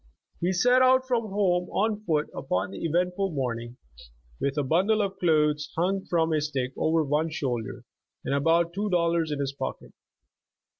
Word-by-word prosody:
He 175 +2 0
set 245 +8 +4
out 260 0 +4
from 235 -3 0
home 180 -3 +1
on 210 +1 0
foot 155 -3 +1
upon 95 -6 -2
the 100 - -7
eventful 180 +4 0
morning, 120 -3 -3 0.6
with 140 +1 -1
a 145 - +1
bundle 185 +10 +2
of 195 -2 -2
clothes 150 -4 +2
hung 190 +3 0
from 165 -2 +1
a 155 - +1
stick 135 -4 -2
over 160 0 +1
one 150 +3 0
shoulder, 125 -7 -4 0.4
and - - -1
about 165 +4 +2
two 205 +3 -2
dollars 170 -3 +1
in 145 - -2
his 140 -1 -2
pocket. - - -6
165 Hz, 165 wpm, -26 LUFS, 145-190 Hz, 0.6 s, set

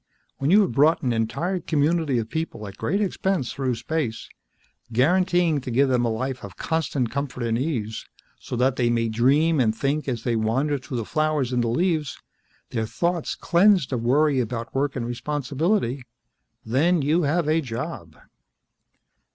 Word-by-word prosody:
When 135 - 0
you 205 +5 +6
have 195 - +1
brought 155 +4 +3
an 125 -2 +1
entire 140 +12 -1
community 160 -3 +1
of 115 -2 -1
people 160 -8 -4
at 100 - -9
great 195 - -1
expense 190 - -1
through 130 -3 -1
space, 125 -1 -3 0.6
guaranteeing 170 +4 +2
to 130 - -6
give 135 +3 +3
them 125 -2 +2
a - - +1
life 130 +3 -3
of 100 -4 -9
constant 145 -7 -1
comfort 135 -2 -3
and 115 -1 0
ease, 115 -5 -3 0.3
so - - -6
that 130 +2 +1
they 120 -2 +2
might 115 -1 0
dream 145 +8 +3
and 110 -3 +2
think 145 +5 -1
as 120 -4 -3
they 120 -2 0
wander 130 +7 0
through 130 0 -6
the 115 - -3
flowers 155 -4 0
and 120 -1 +1
the - - 0
leaves, 155 +3 0 0.5
their 110 -2 -2
thoughts 170 +5 -1
cleansed 180 -5 +3
of 120 - -1
worry 140 +3 +3
about 115 -1 -3
work 140 +1 0
and 125 -3 -2
responsibility, 140 - -1 0.6
then 150 +8 +2
you 155 +5 +2
have 160 +1 +1
a 160 +1 +2
job. 120 - -6
135 Hz, 170 wpm, -24 LUFS, 120-160 Hz, 0.6 s, you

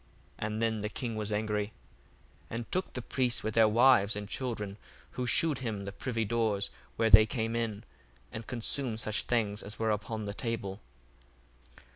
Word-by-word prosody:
And 110 +1 -2
then 110 -2 0
the 105 - -2
king 115 +1 -4
was 105 -1 -3
angry, 105 -1 0 0.8
1:21 - - -5
And 115 0 -5
took 185 +1 -1
the 125 - -4
priests 125 -2 0
with 110 0 -2
their 110 0 +6
wives 110 -3 +5
and 105 -1 -5
children, 105 -4 -3 0.3
who 125 -1 -3
shewed 155 +2 +3
him 110 -6 -3
the 100 - -4
privy 115 +2 -2
doors, 110 -2 0 0.2
where 115 -1 +2
they 110 +1 +9
came 115 0 -1
in, 115 -2 -2 0.5
and 110 - -7
consumed 120 -1 +1
such 110 -1 0
things 110 -3 0
as 105 +2 -7
were 110 -1 +1
upon 110 +1 -3
the 100 - -4
table. 105 -4 -4
110 Hz, 175 wpm, -31 LUFS, 105-115 Hz, 0.8 s, they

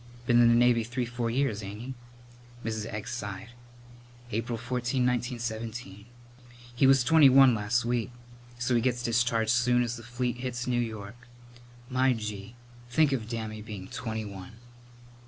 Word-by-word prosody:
"Been 120 0 +5
in 120 - +6
the 115 - +5
Navy 120 -1 +4
three 120 +2 -3
four 120 0 -3
years, 120 -3 0
ain't 100 +1 -7
he?" 130 +3 -6 0.7
Mrs. 110 -1 -3
Egg 105 +2 -5
sighed. 110 -2 -6 0.8
"April 115 +2 -2
14, 125 +2 -1
1917. 115 -4 -3 0.7
He 135 +2 +4
was 135 -1 +5
twenty 155 0 +6
one 135 -1 +7
las' 115 +3 0
week, 120 -2 0 0.5
so 125 +1 0
he 120 - +3
gets 120 0 0
discharged 115 -1 +1
soon 125 0 +3
as 120 0 -3
the 115 - -10
fleet 120 +1 -3
hits 125 -1 -4
New 120 -1 +1
York. 110 +1 -7 0.6
My 130 0 +2
gee, 105 -1 -6 0.3
think 145 +4 +3
of 115 -5 -2
Dammy 110 -2 -4
being 105 -3 -8
twenty 110 -3 -4
one!" 95 -2 -9
120 Hz, 155 wpm, -28 LUFS, 110-125 Hz, 0.8 s, one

